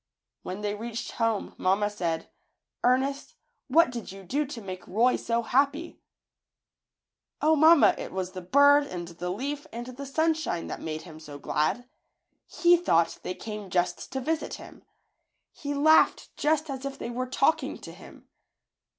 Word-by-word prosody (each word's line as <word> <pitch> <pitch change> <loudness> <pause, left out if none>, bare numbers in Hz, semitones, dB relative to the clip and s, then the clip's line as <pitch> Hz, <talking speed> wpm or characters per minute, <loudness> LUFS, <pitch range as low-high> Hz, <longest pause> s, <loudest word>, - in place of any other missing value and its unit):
When 190 +3 -6
they 205 -1 -1
reached 230 +2 -5
home 225 -3 -1
mamma 195 +3 +2
said 170 -5 -2
^ - - -28 0.6
^Ernest, 270 +2 0 0.3
what 310 +1 +4
did 235 -6 -6
you 195 0 -10
do 285 +10 -1
to 260 -4 -7
make 185 -4 -8
Roy 235 +6 +3
so 235 0 -1
happy?" 285 +8 0 1.4
^^0, 315 +1 +4
mamma, 315 +1 +7
it - - -6
was 185 -1 -3
the 185 - -7
bird 285 +8 +5
and 175 -8 -6
the 175 +1 -6
leaf 280 +9 -4
and 235 +1 -6
the 255 +2 -8
sunshine 315 - 0
that - - -6
made 155 0 -5
him 160 -2 -11
so 150 -2 -10
glad. 155 - -1 0.6
He 345 0 +4
thought 170 - +1
they 180 - -4
came 210 -3 -7
just 175 0 -1
to 265 - -1
visit 315 +4 -2
him. - - -13 0.7
He 285 0 -5
laughed 315 +3 +4
just 310 0 +1
as 265 -1 -6
if 275 0 -5
they 235 - -5
were 255 +2 -3
talking 275 +4 +1
to - - -9
him. - - -15
240 Hz, 165 wpm, -27 LUFS, 185-285 Hz, 1.4 s, mamma